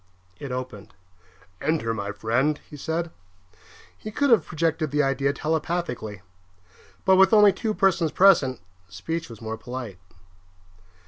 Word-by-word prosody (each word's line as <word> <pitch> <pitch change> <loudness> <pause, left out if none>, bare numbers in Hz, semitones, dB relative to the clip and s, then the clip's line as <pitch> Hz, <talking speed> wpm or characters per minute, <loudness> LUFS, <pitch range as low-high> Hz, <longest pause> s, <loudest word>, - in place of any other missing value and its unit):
It 140 - -6
opened. 125 -6 -7 0.7
"Enter, 150 -8 0
my 100 -2 -4
friend," 120 +9 0
he - - -11
said. 160 +3 -3 0.8
He 215 - -8
could 280 +5 +1
have 230 - +4
projected 160 -1 -1
the 150 +1 +1
idea 135 0 +1
telepathically; 150 - -3 0.8
but 190 0 +5
with 190 +2 +5
only 210 -2 +7
two 220 -2 -3
persons 180 -5 +2
present, 160 - +4 0.3
speech 160 - -5
was 115 -1 -11
more 110 0 -4
polite. 120 -5 -7
150 Hz, 130 wpm, -24 LUFS, 115-170 Hz, 0.8 s, only